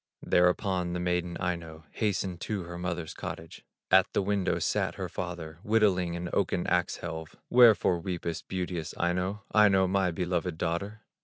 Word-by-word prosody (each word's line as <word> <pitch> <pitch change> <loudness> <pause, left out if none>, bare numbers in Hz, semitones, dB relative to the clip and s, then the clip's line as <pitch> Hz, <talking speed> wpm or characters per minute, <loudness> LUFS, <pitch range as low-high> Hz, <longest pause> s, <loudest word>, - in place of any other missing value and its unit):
Thereupon 90 0 +2
the 90 - -2
maiden, 90 -1 -1
Aino, 85 -3 -4
Hastened 95 -5 -2
to 105 -4 -3
her 85 +1 -7
mother's 85 -3 -3
cottage. 80 0 -7 0.3
At 95 0 +5
the - - +1
window 100 -1 0
sat - - 0
her - - -4
father 85 -3 -6
Whittling 95 -5 +2
on 85 - -4
an 90 - -4
oaken 90 -2 0
ax 90 -1 +1
helve: 80 -2 -6 0.2
"Wherefore 115 -7 +6
weepest, 85 -2 -4
beauteous 90 -3 -4
Aino, 90 +4 -1
Aino, 100 -3 +5
my 95 0 +1
beloved 90 0 -2
daughter?" 100 +6 -3
90 Hz, 155 wpm, -29 LUFS, 85-95 Hz, 0.3 s, Wherefore